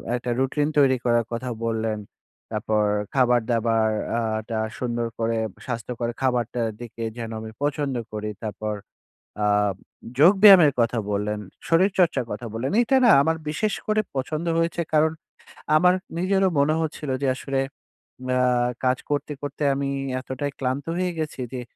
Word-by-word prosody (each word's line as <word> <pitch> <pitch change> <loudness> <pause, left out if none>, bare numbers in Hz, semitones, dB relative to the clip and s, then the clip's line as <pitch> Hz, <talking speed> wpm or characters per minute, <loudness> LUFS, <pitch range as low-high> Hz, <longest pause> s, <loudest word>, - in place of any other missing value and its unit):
একটা 125 0 -3
রুটিন 140 +3 +1
তৈরি 135 -3 +5
করার 120 -1 +3
কথা 125 +2 -3 0.2
বললেন। 110 -1 -1 0.5
তারপর 110 -1 0 0.3
খাবার 125 -2 +4
দাবার 115 -1 +2 0.3
আ - - 0 0.3
টা 110 -1 -1 0.2
সুন্দর 120 -1 -1
করে 115 0 0 0.3
স্বাস্থ্যকর 120 0 -3
খাবারটার 120 -2 0
দিকে 115 -1 -7
যেন 115 -1 -5
আমি 110 0 -7
পছন্দ 145 -2 -1 0.2
করি। 105 0 -3
তারপর 105 0 -3 0.7
আ - - +3 0.7
যোগব্যায়ামের 190 -2 +8
কথা 115 0 +2
বললেন, 105 +1 -1 0.3
শরীরচর্চার 175 -6 +3
কথা 105 +3 -5
বললেন। 120 +7 -2
এটা 265 +3 +2
না 235 - +7
আমার 160 +2 +1
বিশেষ 210 +7 -1
করে 215 0 +2
পছন্দ 155 +5 -2
হয়েছে। 165 0 0
কারণ 155 +1 +4 0.7
আমার 180 +3 +5 0.2
নিজেরও 190 +1 +2
মনে 155 +2 +3
হচ্ছিল 150 -3 -3
যে, - - +2
আসলে 135 0 -2 0.7
মা 125 - +1 0.5
কাজ 130 0 +3
করতে, 145 0 -1
করতে 145 +1 -4
আমি 140 0 -2 0.3
এতটাই 140 +2 -4
ক্লান্ত 130 +1 -2
হয়ে 180 -1 0
গেছি 150 -4 -4
যে, 125 - -3
130 Hz, 145 wpm, -24 LUFS, 115-155 Hz, 0.7 s, যোগব্যায়ামের